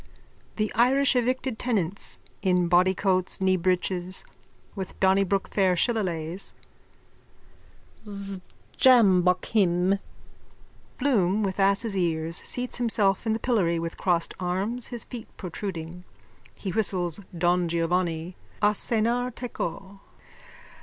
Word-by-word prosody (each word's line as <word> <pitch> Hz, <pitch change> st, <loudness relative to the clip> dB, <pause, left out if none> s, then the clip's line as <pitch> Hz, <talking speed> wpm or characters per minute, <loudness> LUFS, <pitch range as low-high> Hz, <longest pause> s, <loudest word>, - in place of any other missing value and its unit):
THE 215 Hz, 0 st, -1 dB
IRISH 265 Hz, +3 st, +3 dB
EVICTED 255 Hz, -1 st, 0 dB
TENANTS: 200 Hz, -6 st, -1 dB, 0.2 s
(In 180 Hz, -2 st, +2 dB
bodycoats, 185 Hz, +1 st, +2 dB
kneebreeches, 185 Hz, 0 st, 0 dB, 0.5 s
with 190 Hz, -3 st, -7 dB
Donnybrook 195 Hz, 0 st, +2 dB
fair 190 Hz, -3 st, +2 dB
shillelaghs.) 180 Hz, -5 st, -1 dB, 2.2 s
Sjambok 190 Hz, -8 st, +5 dB
him! 190 Hz, -2 st, +2 dB, 1.0 s
(Bloom 215 Hz, -7 st, +2 dB
with 195 Hz, 0 st, -2 dB
asses' 200 Hz, +2 st, +2 dB
ears 165 Hz, -2 st, -1 dB
seats 245 Hz, 0 st, -5 dB
himself 215 Hz, -4 st, +1 dB
in 220 Hz, -, +2 dB
the 220 Hz, -, -2 dB
pillory 195 Hz, -10 st, +1 dB
with 165 Hz, 0 st, -5 dB
crossed 175 Hz, -3 st, +1 dB
arms, 195 Hz, +7 st, -2 dB
his 240 Hz, -2 st, -5 dB
feet 235 Hz, -3 st, -8 dB
protruding. 180 Hz, -2 st, -6 dB, 0.5 s
He 195 Hz, -, -5 dB
whistles 180 Hz, -4 st, +1 dB, 0.2 s
Don 175 Hz, +1 st, +2 dB
Giovanni, 170 Hz, 0 st, -1 dB, 0.2 s
a 210 Hz, 0 st, +3 dB
cenar 235 Hz, +3 st, 0 dB
teco. 200 Hz, -5 st, -6 dB
190 Hz, 100 wpm, -26 LUFS, 180-220 Hz, 2.2 s, Sjambok